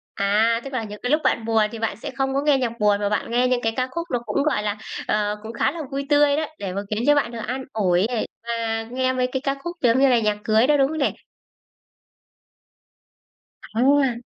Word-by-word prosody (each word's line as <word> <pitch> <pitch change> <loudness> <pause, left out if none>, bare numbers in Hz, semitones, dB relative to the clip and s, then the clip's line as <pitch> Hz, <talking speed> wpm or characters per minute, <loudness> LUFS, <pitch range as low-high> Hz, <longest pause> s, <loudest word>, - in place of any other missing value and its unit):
À, 220 +4 +2
tức 275 - -8
là 245 -3 -1
những 210 -1 -8
cái 245 - -1
lúc 305 +1 +3
bạn 225 - +1
buồn 225 -1 +3
thì 230 - -7
bạn 225 -2 -1
sẽ - - -6
không 270 0 0
có 275 - +1
nghe 290 -2 +3
nhạc 235 -2 -3
buồn 205 -1 +3
mà 205 - 0
bạn 210 +2 -2
nghe 245 +1 +3
những 250 -1 +1
cái 225 -1 0
ca 255 -1 0
khúc 335 +2 -4
nó 245 - +1
cũng, 280 - 0
gọi 285 -8 0
là, 205 0 -2 0.3
ờ, 210 0 0
cũng 225 +1 -7
khá 235 - +1
là 335 - -8
vui 275 0 -3
tươi 290 -1 +4
đó, 315 - 0
để 190 -2 -4
mà 200 - -2
khiến 215 +2 -2
cho 295 - +6
bạn 285 -5 +1
được 235 - -6
an 260 +2 -3
ủi 185 -2 +2
này 235 -2 -2 0.2
và 225 -1 -1
nghe 255 +2 -1
mấy 250 0 +1
cái 265 0 -2
ca 275 - 0
khúc 345 0 -5
giống 245 +1 +4
như 275 - +5
là 245 -2 +4
nhạc 210 -1 0
cưới 220 +3 +3
đó, 295 0 +4
đúng 270 - +4
không 315 +2 -4
nè? 280 - +1 2.6
À. 260 0 +3
240 Hz, 245 wpm, -23 LUFS, 220-275 Hz, 2.6 s, cho